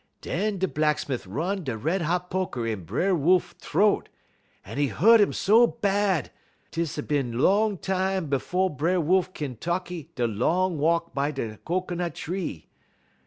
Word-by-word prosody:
"Dun 205 +3 -1
da 190 - +1
Blacksmit' 150 - -1
run 175 - -2
da 130 -6 -3
red 165 - 0
hot 180 +2 -1
poker 180 -11 -2
in 110 -6 -3
B'er 190 - +1
Wolf 175 +4 +2
t'roat, 200 +6 +1 0.6
un - - -6
'e 145 - +3
hu't 210 - +5
um 205 - +3
so 225 +4 +5
bad, 200 -6 0 0.4
'tiss 165 -3 -2
a 150 - -2
bin 135 -6 -1
long 205 - +3
tam 190 0 -1
befo' 180 +7 0
B'er 165 +5 0
Wolf 185 +3 +2
kin 145 -9 -5
tekky 175 +1 -3
da 125 - 0
long 165 - 0
walk 165 +2 +1
by 140 +1 0
da 115 -7 -4
cocoanut 175 -1 -2
tree. 170 - -5
170 Hz, 160 wpm, -26 LUFS, 145-190 Hz, 0.6 s, hu't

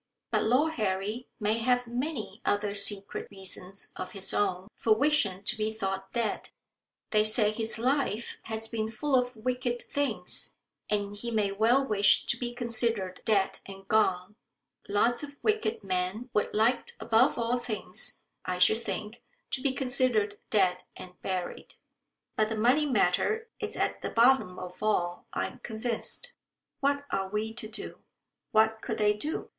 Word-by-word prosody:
But - - +2
Lord 280 +8 +3
Harry 205 +5 -1
may 215 +1 +1
have 245 +1 +2
many 240 -3 -4
other 205 0 +1
secret 200 0 +2
reasons 195 -1 -5
of 185 0 -6
his 195 -2 -1
own 190 -2 0
for 220 -1 +3
wishing 220 -9 +2
to 235 - -1
be 215 0 -1
thought 195 -3 -4
dead. 230 -3 -1 0.6
They 215 -1 +4
say 215 0 +5
his 225 +1 0
life 250 -2 0
has 220 0 0
been 220 -1 -2
full 265 +6 0
of 250 -1 +1
wicked 245 +1 -2
things, 285 0 -1 0.3
and 205 -1 0
he 235 +3 -4
may 210 -3 +1
well 230 +7 +3
wish 205 -5 +4
to - - +1
be 240 -1 -2
considered 230 -6 0
dead 200 -3 +2
and 195 0 -10
gone. 205 -2 +1 0.5
Lots 225 +4 +2
of 285 -1 -8
wicked 435 - 0
men 190 +6 -2
would 210 - +1
like 230 +4 +1
above 230 +4 +3
all 240 +1 0
things, 230 -3 -2 0.2
I 180 0 -2
should 200 +5 +4
think, 215 0 -5 0.3
to 260 - -1
be 275 -1 +2
considered 250 -6 +1
dead 185 -4 +2
and 180 0 -11
buried. 185 -2 -4 0.6
But 215 0 +2
the 220 - -2
money 255 +7 +3
matter 280 - +1
is 430 -1 -3
at - - -1
the - - -3
bottom 235 -6 +4
of 180 +1 -8
all, 175 -5 0
I - - -1
am - - -8
convinced. 235 - -3 0.5
What 285 +1 +1
are 190 -1 -1
we 215 +2 -2
to 225 -2 -6
do?" 215 +1 -6 0.5
What 220 0 +3
could - - -3
they 210 -1 +3
do? 295 +10 -4
220 Hz, 160 wpm, -29 LUFS, 200-245 Hz, 0.6 s, say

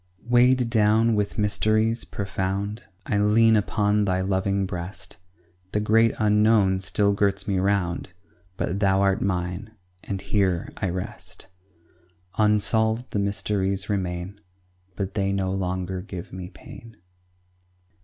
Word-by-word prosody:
Weighed 125 +1 +4
down 110 +1 +3
with 105 -1 -1
mysteries 110 +2 +1
profound 100 +3 -3 0.2
I 100 - 0
lean 110 +2 +4
upon 105 0 +1
Thy 95 -1 0
loving 95 +1 0
breast; 90 +1 -7 0.6
The 105 - +2
great 110 +2 +3
unknown 105 -2 +3
still 100 +2 +1
girts 100 0 0
me 95 -2 +1
round, 95 -3 0 0.5
But 95 - -2
Thou 95 -1 +3
art 100 -1 +2
mine, 95 +3 -3 0.3
and 100 -2 -4
here 95 -4 0
I 100 - -1
rest; 90 +1 -7 0.9
Unsolved 110 +2 +2
the 105 - -1
mysteries 100 -1 -1
remain; 95 0 -3 0.5
But 100 0 -4
they 100 -2 0
no 95 -1 -1
longer 95 -1 -3
give 95 -1 -8
me 90 -1 -7
pain. 115 +2 -13
100 Hz, 125 wpm, -24 LUFS, 95-105 Hz, 0.9 s, Weighed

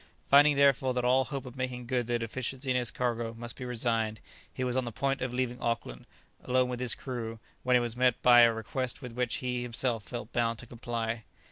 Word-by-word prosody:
Finding 145 +1 +6
therefore 135 -2 +3
that 125 -1 0
all 130 +1 +4
hope 140 -3 -5
of 125 0 -9
making 125 -1 -4
good 120 -1 -1
the 120 0 +1
deficiency 130 +3 -3
in - - +1
his 125 -2 +2
cargo 120 -2 -2
must 120 0 -5
be 125 - -7
resigned, 115 -3 0 0.3
he 130 - -4
was 125 -1 -1
on 130 - +1
the 120 - -5
point 135 +4 -1
of 130 -1 -2
leaving 125 -1 -2
Auckland, 115 - -3 0.4
alone 125 0 +2
with 125 -1 -4
his 125 -2 +3
crew, 115 -4 -5 0.2
when 125 0 +3
he - - +6
was 120 -1 -2
met 125 0 +2
by 120 -1 +8
a 120 -1 +7
request 120 +5 -4
with 125 - -6
which 125 0 -1
he 125 -1 -2
felt 120 -1 0
himself 120 -2 -6
bound 115 -1 +1
to 120 - -9
comply. 115 -1 -4
125 Hz, 225 wpm, -30 LUFS, 115-130 Hz, 0.4 s, by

